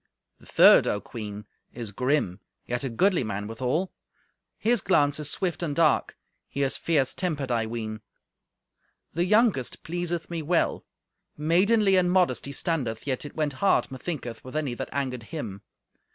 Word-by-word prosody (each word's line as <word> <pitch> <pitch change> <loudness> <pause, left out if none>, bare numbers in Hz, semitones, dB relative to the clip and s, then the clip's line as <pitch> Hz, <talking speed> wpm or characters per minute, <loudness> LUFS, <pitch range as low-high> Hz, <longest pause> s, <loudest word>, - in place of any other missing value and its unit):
The - - -18
third, - - +7
O 105 - 0
Queen, 105 -1 -7 0.3
is 115 -4 -6
grim, 125 -5 0 0.3
yet 120 +1 -2
a 135 - -1
goodly 180 - +2
man 105 -2 -3
withal. 130 - -2 0.7
His 230 -1 +1
glance 145 -6 +2
is 150 -1 -2
swift 175 +3 -2
and 155 -4 -2
dark; 165 -2 +2 0.3
he 140 - -1
is 135 - +1
fierce 150 -6 +1
tempered, 150 -8 -2
I 115 -2 +1
ween. 110 -1 -5 1.1
The 170 +2 +1
youngest 210 - +2
pleaseth 175 0 -3
me 170 -2 -4
well. 165 +3 +1 0.5
Maidenly 190 +6 +3
and 180 -1 +3
modest 180 -9 +2
he - - -5
standeth, 140 -8 -2
yet 135 0 -2
it 145 - -9
went 150 -3 -1
hard, 200 - +3
methinketh, 130 -4 -5
with 130 +3 -10
any 150 -5 -1
that - - -5
angered 130 -3 -2
him. 100 -3 -6
145 Hz, 160 wpm, -26 LUFS, 120-175 Hz, 1.1 s, third